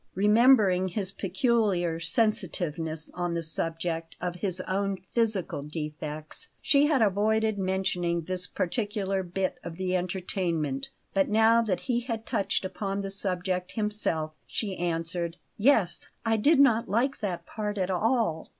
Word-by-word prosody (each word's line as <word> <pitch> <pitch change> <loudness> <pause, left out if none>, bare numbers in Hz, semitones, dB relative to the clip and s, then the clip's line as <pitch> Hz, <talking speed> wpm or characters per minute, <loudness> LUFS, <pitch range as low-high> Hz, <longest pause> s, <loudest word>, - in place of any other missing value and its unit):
Remembering 210 -2 +5
his 190 +1 -3
peculiar 195 - +1
sensitiveness 170 - 0
on 175 -1 -2
the 170 - -2
subject 165 +1 -3
of 175 0 -3
his 185 -1 -2
own 195 +1 -1
physical 220 -10 0
defects, 150 - -5
she 285 0 +4
had 280 -7 +3
avoided 215 +1 +2
mentioning 185 -2 0
this 180 +2 -2
particular 195 -1 -1
bit 185 +1 -2
of 170 -1 -6
the 185 0 -1
entertainment; 175 -6 -2 0.2
but 195 -1 +2
now 225 +2 +5
that 205 -6 -1
he 245 -3 0
had 230 -2 -4
touched 205 -4 0
upon 195 +1 -3
the 195 0 -4
subject 185 -2 -1
himself, 210 -8 +1
she 200 -4 -2
answered: 170 0 -2 0.2
"Yes; 215 -6 +2 0.2
I 225 0 +3
did 280 +8 +4
not 235 -4 +4
like 240 +7 +1
that 180 -5 -3
part 210 +1 -4
at 190 -1 0
all." 215 -4 0
190 Hz, 140 wpm, -28 LUFS, 170-220 Hz, 0.2 s, Remembering